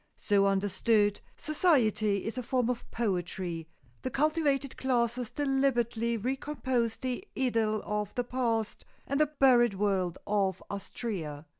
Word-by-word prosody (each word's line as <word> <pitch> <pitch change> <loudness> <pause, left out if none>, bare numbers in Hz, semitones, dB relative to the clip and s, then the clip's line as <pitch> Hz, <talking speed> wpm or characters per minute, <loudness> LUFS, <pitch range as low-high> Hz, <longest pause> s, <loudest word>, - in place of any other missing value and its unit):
So 200 -1 +3
understood, 205 +2 +2 0.2
society 225 - +2
is 225 - -3
a 255 - -2
form 250 0 +1
of 245 - -6
poetry; 180 -6 -2 0.3
the 255 - -2
cultivated 285 -1 +1
classes 240 -2 0
deliberately 240 -5 +1
recompose 255 -1 -1
the 255 +6 -3
idyll 225 -4 +1
of 210 -1 -2
the 245 - 0
past 235 -3 -1 0.2
and 280 - -1
the 305 - +4
buried 250 -7 +4
world 190 -3 0
of 195 -3 0
Astrea. 190 -7 -5
235 Hz, 125 wpm, -30 LUFS, 205-260 Hz, 0.3 s, the